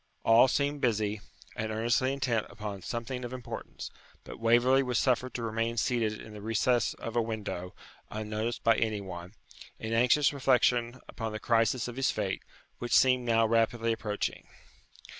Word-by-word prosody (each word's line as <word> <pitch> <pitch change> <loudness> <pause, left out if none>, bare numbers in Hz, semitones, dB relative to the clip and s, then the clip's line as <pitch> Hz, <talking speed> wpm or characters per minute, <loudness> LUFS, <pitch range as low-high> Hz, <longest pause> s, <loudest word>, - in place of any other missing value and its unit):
All 115 +3 +6
seemed 145 +2 0
busy, 105 -3 0 0.3
and 110 0 -3
earnestly 120 +4 +1
intent 130 -5 -1
upon 100 -1 -6
something 125 +5 -4
of 120 +1 -5
importance; 125 -2 -7 0.3
but - - -10
Waverley 120 +4 +4
was 125 -3 -1
suffered 130 +1 +1
to 120 - -3
remain 115 +1 -1
seated 110 -2 0
in 110 - -10
the 105 - -9
recess 115 +2 +1
of 115 - -7
a 120 - +3
window, 105 -5 -5 0.3
unnoticed 110 +2 -3
by 115 0 +4
any 110 -2 0
one, 90 0 -8 0.4
in 110 0 -4
anxious 125 +6 +4
reflection 125 -2 +2
upon 115 -2 -5
the 110 - -4
crisis 115 +2 +2
of 120 0 -7
his 135 - +2
fate, 100 -3 -2 0.4
which 120 - +3
seemed 130 -1 +4
now 115 -1 +3
rapidly 115 +1 +2
approaching. 105 -2 -3
115 Hz, 160 wpm, -30 LUFS, 110-125 Hz, 0.4 s, All